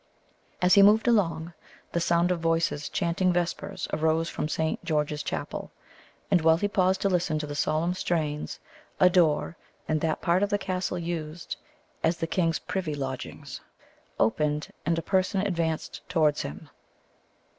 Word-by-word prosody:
As 180 0 +5
he 200 - +8
moved 210 +4 +6
along, 170 -7 +1 0.4
the 170 - 0
sound 170 +1 +2
of 180 - 0
voices 165 -3 0
chanting 180 +1 +1
vespers 175 -1 -2
arose 160 +1 +1
from 150 - -3
Saint 160 +2 -1
George's 150 -3 0
Chapel; - - -4 0.6
and 180 -4 +5
while 160 0 +5
he 205 - 0
paused 190 -1 +2
to - - +2
listen 175 -4 +1
to 150 - -3
the 145 - -6
solemn 155 +4 0
strains, 155 -5 -2 0.4
a 180 -1 +6
door, 170 -2 +2 0.3
in 155 0 +1
that 160 0 0
part 175 +1 +2
of 205 - +2
the 205 - +2
castle 185 -2 -2
used 165 -1 -4 0.5
as 165 +1 +2
the - - -1
king's 165 0 +1
privy 180 -6 -3
lodgings, 130 -2 -6 0.6
opened, 150 +6 +1 0.2
and 165 0 +2
a 165 - -2
person 190 +2 +1
advanced 170 -5 -2
towards 155 -4 +2
him. 75 +2 -8
170 Hz, 155 wpm, -27 LUFS, 155-185 Hz, 0.6 s, he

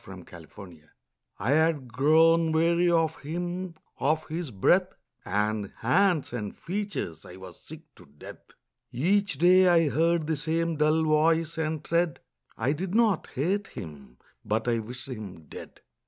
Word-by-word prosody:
THOU - - -12
SHALT 90 -2 -12
NOT 85 -2 -13
KILL 95 -5 -11 0.6
I 110 +7 -1
had 150 -5 +1
grown 160 +4 +4
weary 170 +2 +2
of 165 -2 +1
him; 175 +4 -5 0.2
of 155 +5 0
his 165 -1 -4
breath 180 - +2 0.3
And 105 0 -2
hands 175 - +2
and 105 -4 -5
features 185 - -5
I 90 - -12
was 95 0 -12
sick - - -11 0.2
to - - -17
death. 70 +1 -14 0.4
Each 185 +5 0
day 185 +4 +5
I 165 -3 +4
heard 165 +2 +1
the 160 0 -1
same 165 +2 -1
dull 155 +1 +2
voice 160 +1 +2
and 155 -1 -2
tread; 170 0 0 0.4
I 135 - 0
did 185 +5 -4
not 225 -6 +2
hate 190 +9 -1
him: 70 -7 -11 0.3
but 110 +2 -2
I 115 -1 +1
wished 125 +4 -8
him 105 -10 -8
dead. 75 - -12
155 Hz, 155 wpm, -27 LUFS, 115-170 Hz, 0.6 s, day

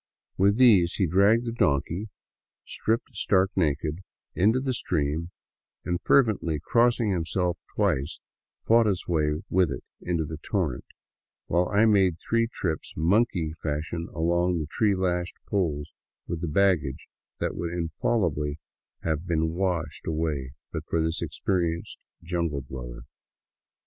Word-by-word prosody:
With 100 +2 +3
these 100 -9 +6
he 95 - +2
dragged 100 +7 +4
the 115 - -2
donkey, 85 +1 0 0.6
stripped 115 +2 -2
stark 95 -2 +2
naked, 80 -1 0 0.3
into 110 +7 +3
the 130 0 -1
stream 80 -5 -1 0.6
and, 90 -1 -1
fer 140 - +6
vently 85 -9 -2
crossing 115 - +2
himself 85 0 -1 0.2
twice, 70 +5 0 0.5
fought 115 0 +5
his 95 -3 0
way 75 -2 0
with 90 -2 +3
it - - -5 0.2
into 85 -3 -1
the 80 0 -6
torrent; - - -2 0.6
while 90 +1 +1
I 105 +2 +4
made 95 -5 +4
three 115 +4 +1
trips 80 -9 -3
mbnkey 85 -2 +2
fashion 80 +3 -3
along 85 +2 +1
the 80 - -2
tree 100 +6 +1
lashed 90 -1 -1
poles 80 -8 -1 0.3
with 85 -2 -4
the 85 - -2
baggage 80 -5 +1 0.3
that - - -1
would 85 -1 -3
infallibly 80 -3 -1 0.5
have 80 +1 -2
been 80 -2 +1
washed 85 -4 -2
away 75 -5 -2 0.2
but - - -3
for 85 - +1
this 80 0 0
experienced 85 -3 -2 0.2
jungle 85 -4 -1
dweller. - - -8
85 Hz, 135 wpm, -26 LUFS, 80-100 Hz, 0.6 s, these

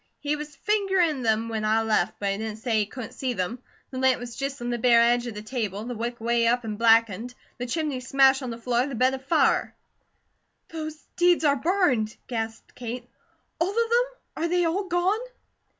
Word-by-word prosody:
He 295 +1 -1
was 300 -1 -8
fingerin' 380 -7 +1
them 225 -1 +1
when 220 -1 -3
I 220 +1 +2
left, 215 -2 +1
but 200 -1 -1
he 195 - -2
didn't 220 -1 -4
say 225 -1 0
he 210 - 0
couldn't 240 -1 -7
see 260 -2 -2
them. 195 +4 -3 0.3
The 260 - -4
lamp 260 -1 +3
was 240 -1 -7
just 275 0 -4
on 240 0 -3
the 240 - -2
bare 235 0 +5
edge 240 +1 +3
of 230 - -6
the 210 - -6
table, 215 -3 -3
the 245 +2 -5
wick 240 +1 -4
way 235 0 +2
up 240 0 +1
an' 215 -1 -3
blackened, 230 +1 +3 0.2
the 245 - -3
chimney 300 -1 -2
smashed 270 +1 +4
on 255 - -4
the 230 - -5
floor, 245 +2 0
the 275 - -5
bed 255 +3 +3
afire." 265 +4 +1 0.9
"Those 310 -1 -5 0.2
deeds 350 -1 +4
are 285 -1 +4
burned?" 270 - +1
gasped 225 -2 -5
Kate. 240 0 -6 0.5
"All 335 +3 +2
of 405 - -6
them? 465 +1 +3 0.4
Are - - +2
they 355 0 +2
all 370 +5 0
gone?" 360 +4 +1
245 Hz, 205 wpm, -26 LUFS, 225-300 Hz, 0.9 s, bare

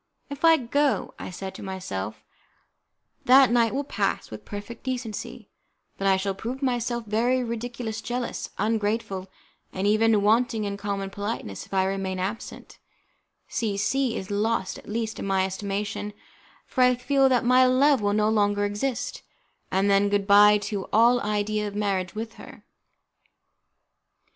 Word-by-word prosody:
"If 285 +2 -7
I 325 -1 +7
go," 280 +2 0 0.2
said 190 +1 -6
I - - -17
to - - -10
myself, 110 - -5 1.0
"that 260 0 +7
night 235 -2 +3
will 275 +3 -1
pass 285 - -2
with - - -9
perfect 205 +2 -8
decency, 245 -4 -5 0.5
but 195 - 0
I 190 -1 +4
shall 195 +1 -1
prove 245 +8 -6
myself 240 -2 -1
very 240 +4 +1
ridiculous, 235 -1 -4
jealous, 245 +1 -4
ungrateful, 210 -2 -1 0.4
and 190 +1 -3
even 215 0 +3
wanting 225 +1 +2
in 200 -1 -3
common 200 -1 -4
politeness: 200 - -5
if - - -15
I 190 0 +3
remain 190 -1 -2
absent, 195 +5 -6 0.7
C 210 -4 -2
C 245 +4 0
is 190 +1 -6
lost, 210 -1 -1
at - - -14
least, 225 0 -3
in - - -4
my 190 -1 +2
estimation, 205 +2 -4 0.5
for 260 - -2
I 250 0 +5
feel 270 +2 +2
that 250 -2 +2
my 255 +1 +5
love 265 0 +4
will 205 0 +1
no 210 0 +2
longer 205 -1 +2
exist, 225 +5 -3 0.5
and 190 +2 +1
then 200 0 +3
good 200 -1 +1
bye 205 +1 +7
to 200 -2 -3
all 240 +3 +5
idea 210 0 -1
of 205 - -7
a - - -4
marriage 195 -3 -1
with 225 +1 -5
her." - - -13
210 Hz, 160 wpm, -25 LUFS, 200-240 Hz, 1.0 s, I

